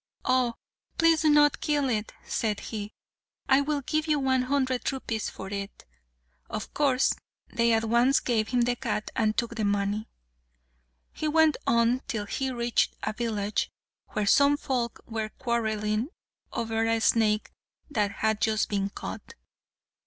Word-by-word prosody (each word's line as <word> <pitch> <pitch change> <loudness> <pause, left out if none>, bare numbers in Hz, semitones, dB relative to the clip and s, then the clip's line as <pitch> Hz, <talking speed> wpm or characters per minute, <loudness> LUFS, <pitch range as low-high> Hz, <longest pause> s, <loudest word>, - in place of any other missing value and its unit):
"Oh! 255 -2 +2 0.4
please 330 -1 +4
do 310 - +4
not 295 0 +5
kill 290 -2 +1
it," 220 -4 -1
said 215 -3 -1
he; 210 -2 -6 0.6
"I 270 +1 +5
will 290 0 -1
give 310 +3 -1
you 305 -1 +3
one 260 -2 +2
hundred 260 -1 0
rupees 230 -5 -3
for 190 - -8
it." 200 0 -6 0.6
Of - - -5
course 270 -3 +3 0.4
they 235 0 +3
at 225 0 +3
once 235 +4 +4
gave 220 -3 0
him 250 -1 +1
the 245 +1 +2
cat 235 -4 -3
and 215 -1 +1
took 235 -1 0
the 225 -2 -3
money. 205 +1 0 1.0
He 310 - -3
went 315 0 +4
on 235 +2 +3
till 220 -6 -2
he 265 +6 -2
reached 240 -2 0
a 215 - -1
village, 215 -2 -1 0.4
where 210 - 0
some 280 +7 +5
folk 245 -5 -2
were 220 -2 -3
quarrelling 220 -1 -1 0.4
over 225 -1 -1
a 225 0 +2
snake 220 -1 +2 0.4
that 210 -6 +1
had 220 +1 0
just 220 -1 +1
been 200 -1 0
caught. - - -8
235 Hz, 150 wpm, -27 LUFS, 215-265 Hz, 1.0 s, not